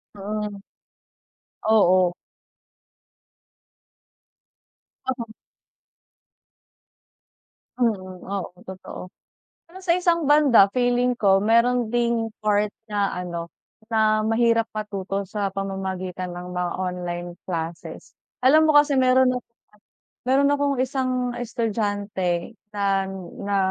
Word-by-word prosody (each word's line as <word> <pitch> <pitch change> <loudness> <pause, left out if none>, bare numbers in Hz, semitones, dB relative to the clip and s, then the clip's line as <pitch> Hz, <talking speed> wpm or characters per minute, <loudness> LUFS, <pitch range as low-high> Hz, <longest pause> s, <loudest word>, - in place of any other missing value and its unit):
Oo. 205 0 -4 1.0
Oo. 185 -5 +4 3.0
Oo. 245 -3 -2 2.5
Mm, 185 -7 -1
oo 190 -2 -5
totoo. 185 -1 -9 0.5
Pero 355 +3 -13
sa 350 -1 +2
isang 335 -4 +1
banda, 275 -10 +6
feeling 245 +1 +1
ko 195 -1 +4
meron 235 +1 +3
ding 235 -1 0 0.2
part 210 0 +2 0.2
na 205 -2 0
ano, 170 -2 -5 0.4
na 215 -1 +3
mahirap 230 +1 +2
matuto 200 -2 -4
sa 200 +1 -2
pamamagitan 190 -2 -4
ng 180 +1 -7
mga 180 -1 -1
online 175 -1 -3 0.2
classes. 165 -1 -5 0.3
Alam 310 +3 +6
mo 295 - +6
kasi, 290 -1 +4
meron 255 -1 +4
na - - -1 0.9
meron 275 +2 +3
akong 285 -1 +1
isang 255 -2 -1
estudyante 205 -5 -2 0.2
na 195 -1 +1 0.4
na 200 0 0
210 Hz, 95 wpm, -24 LUFS, 190-245 Hz, 3.0 s, banda